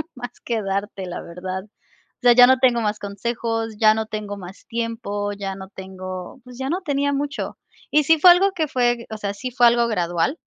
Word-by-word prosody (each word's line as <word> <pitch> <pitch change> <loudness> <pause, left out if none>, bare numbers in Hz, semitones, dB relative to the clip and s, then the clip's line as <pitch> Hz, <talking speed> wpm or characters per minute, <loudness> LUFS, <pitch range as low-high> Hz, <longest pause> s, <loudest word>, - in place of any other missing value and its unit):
más 245 -1 -6
que 230 -2 -1
darte, 195 0 -3
la 180 -1 -6
verdad. 185 +2 -6
O 210 - -35
sea, 245 -1 +7
ya 245 +1 +8
no 260 +1 +5
tengo 245 -3 +3
más 210 0 -1
consejos, 225 +2 -3
ya 215 -1 +6
no 220 0 -2
tengo 210 -2 -5
más 185 0 -11
tiempo, 225 -3 -3
ya 195 -1 -5
no 190 0 -9
tengo, 185 +2 -8
pues, 250 -1 -12
ya 265 +1 -3
no 360 +5 -1
tenía 285 -3 0
mucho". 280 0 -3 0.3
Y 300 0 +4
sí 320 +2 +4
fue 355 +3 +9
algo 390 +3 +4
que 320 -4 -1
fue 240 -2 +1
o 220 - -5
sea, 200 -1 -3
sí 250 +5 -6
fue 245 -1 +5
algo 235 0 +3
gradual, 175 - 0
225 Hz, 210 wpm, -22 LUFS, 200-250 Hz, 0.3 s, fue